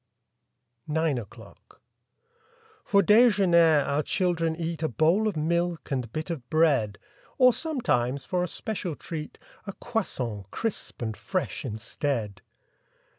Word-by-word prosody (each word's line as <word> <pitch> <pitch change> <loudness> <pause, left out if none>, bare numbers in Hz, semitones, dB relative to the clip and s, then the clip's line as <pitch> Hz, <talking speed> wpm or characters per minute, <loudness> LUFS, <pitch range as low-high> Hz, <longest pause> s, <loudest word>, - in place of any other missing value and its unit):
9 150 - -3
NINE 160 -5 +1
O'CLOCK 105 -4 -14 1.1
F - - -3
or 200 - +7
dejemier 180 - +5
our 145 +1 +1
children 165 -1 0
eat 165 -1 -4
A 160 - +1
bowl 165 - +2
of 205 - -2
milk 170 +1 -1
and 125 -4 -2
bit 155 +5 -4
of 130 -7 -6
bread; 140 -11 +2 0.4
Or 255 -2 +6
sometimes, 140 - -1
for 180 -1 -1
a 180 - 0
special 185 -4 -3
treat, 155 -1 -7 0.3
A 200 - -4
croissant, 125 - -3
crisp 215 - -4
and 110 -2 -3
fresh, 185 - -3
instead. 110 -3 -3
160 Hz, 130 wpm, -27 LUFS, 130-185 Hz, 1.1 s, or